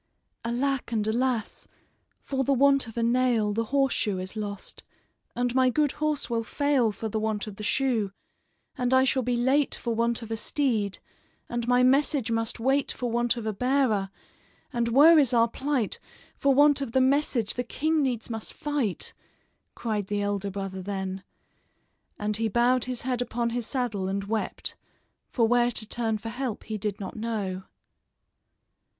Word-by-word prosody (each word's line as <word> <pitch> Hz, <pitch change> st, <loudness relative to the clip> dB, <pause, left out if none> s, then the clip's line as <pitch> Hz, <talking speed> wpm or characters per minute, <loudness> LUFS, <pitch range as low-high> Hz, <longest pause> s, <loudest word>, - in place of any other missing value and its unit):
"Alack 250 Hz, +2 st, -1 dB
and 215 Hz, -2 st, 0 dB
alas! 235 Hz, 0 st, -1 dB, 0.6 s
for 270 Hz, -1 st, -1 dB
the 275 Hz, -, +2 dB
want 275 Hz, -1 st, +4 dB
of 225 Hz, -, -10 dB
a 230 Hz, -, +1 dB
nail 235 Hz, -3 st, +2 dB
The 230 Hz, +2 st, -1 dB
horseshoe 265 Hz, -6 st, +1 dB
is 185 Hz, +3 st, -6 dB
lost; 205 Hz, -2 st, -6 dB, 0.5 s
and 245 Hz, 0 st, 0 dB
my 260 Hz, 0 st, +4 dB
good 295 Hz, +2 st, +2 dB
horse 305 Hz, -4 st, 0 dB
will 230 Hz, -1 st, 0 dB
fail 265 Hz, -1 st, +1 dB
For 220 Hz, +2 st, -5 dB
the 220 Hz, 0 st, -2 dB
want 215 Hz, -1 st, -1 dB
of 210 Hz, -2 st, -9 dB
the 210 Hz, -, -7 dB
shoe; 225 Hz, -3 st, +1 dB, 0.6 s
and 250 Hz, +1 st, +1 dB
I 260 Hz, -, +6 dB
shall 265 Hz, 0 st, +2 dB
be 245 Hz, 0 st, 0 dB
late 265 Hz, +4 st, +2 dB
For 235 Hz, -, -3 dB
want 235 Hz, +1 st, 0 dB
of 225 Hz, -, -9 dB
a 225 Hz, -, -1 dB
steed; 220 Hz, -6 st, 0 dB, 0.5 s
and 240 Hz, 0 st, -3 dB
my 250 Hz, 0 st, +4 dB
message 270 Hz, -2 st, +3 dB
must 225 Hz, 0 st, -1 dB
wait 270 Hz, +4 st, +1 dB
For 245 Hz, -2 st, -3 dB
want 240 Hz, +1 st, +1 dB
of 230 Hz, -, -5 dB
a 215 Hz, -, -1 dB
bearer; 250 Hz, -4 st, +1 dB, 0.6 s
and 235 Hz, -1 st, 0 dB
woe 295 Hz, +8 st, +7 dB
is 270 Hz, -5 st, +4 dB
our 230 Hz, 0 st, +5 dB
plight, 265 Hz, -2 st, -1 dB, 0.4 s
For 280 Hz, -, +2 dB
want 285 Hz, +1 st, +5 dB
of 250 Hz, -5 st, -4 dB
the 260 Hz, -, +4 dB
message 260 Hz, -4 st, +2 dB
the 245 Hz, -, -2 dB
king 310 Hz, +5 st, 0 dB
needs 250 Hz, -5 st, -1 dB
must 225 Hz, -6 st, -6 dB
fight!" 285 Hz, -10 st, -2 dB, 0.6 s
cried 210 Hz, -4 st, -2 dB
the 205 Hz, 0 st, -1 dB
elder 200 Hz, -1 st, -1 dB
brother 195 Hz, -1 st, -5 dB
then; 190 Hz, -1 st, -4 dB, 0.9 s
and 210 Hz, 0 st, -1 dB
he 225 Hz, 0 st, 0 dB
bowed 240 Hz, +3 st, +3 dB
his 250 Hz, -1 st, -4 dB
head 250 Hz, -1 st, -1 dB
upon 235 Hz, -1 st, -1 dB
his 240 Hz, -1 st, -3 dB
saddle 235 Hz, -8 st, -1 dB
and 195 Hz, +1 st, -2 dB
wept, 215 Hz, +2 st, -2 dB, 0.5 s
for 230 Hz, -3 st, +2 dB
where 240 Hz, +1 st, +3 dB
to 220 Hz, -2 st, -2 dB
turn 225 Hz, 0 st, -1 dB
for 225 Hz, +2 st, -6 dB
help 245 Hz, -1 st, -4 dB
he 215 Hz, -1 st, -4 dB
did 205 Hz, -1 st, -3 dB
not 195 Hz, -, -6 dB
know. 205 Hz, -5 st, -3 dB
235 Hz, 175 wpm, -27 LUFS, 215-260 Hz, 0.9 s, woe